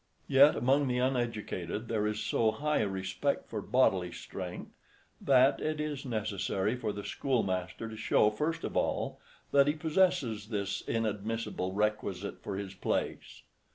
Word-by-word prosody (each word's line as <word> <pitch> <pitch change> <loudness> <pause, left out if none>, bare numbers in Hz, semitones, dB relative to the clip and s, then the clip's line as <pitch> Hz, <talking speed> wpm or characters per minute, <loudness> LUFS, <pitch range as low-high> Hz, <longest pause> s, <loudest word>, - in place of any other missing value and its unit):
Yet 140 +2 +7
among 135 +3 +2
the 125 -1 0
uneducated 115 -6 -2
there 105 -2 0
is 105 0 -2
so 115 - +2
high 150 +6 0
a 105 - +1
respect 95 +8 -2
for 110 - -4
bodily 95 -7 +2
strength, 90 +1 -7 0.5
that 135 0 +5
it 155 0 -2
is 150 -3 -3
necessary 105 -1 -1
for 115 -4 -2
the 100 0 -6
schoolmaster 100 -7 -1
to 110 - -7
show, 110 -1 +3
first 155 +9 -2
of - - -4
all, - - 0 0.3
that 140 0 +5
he 145 - +3
possesses 155 - +1
this 100 -3 -2
inadmissible 110 -3 -2
requisite 100 -2 -2
for 100 - -4
his 100 -1 -5
place. 95 - -3
110 Hz, 150 wpm, -31 LUFS, 100-135 Hz, 0.5 s, Yet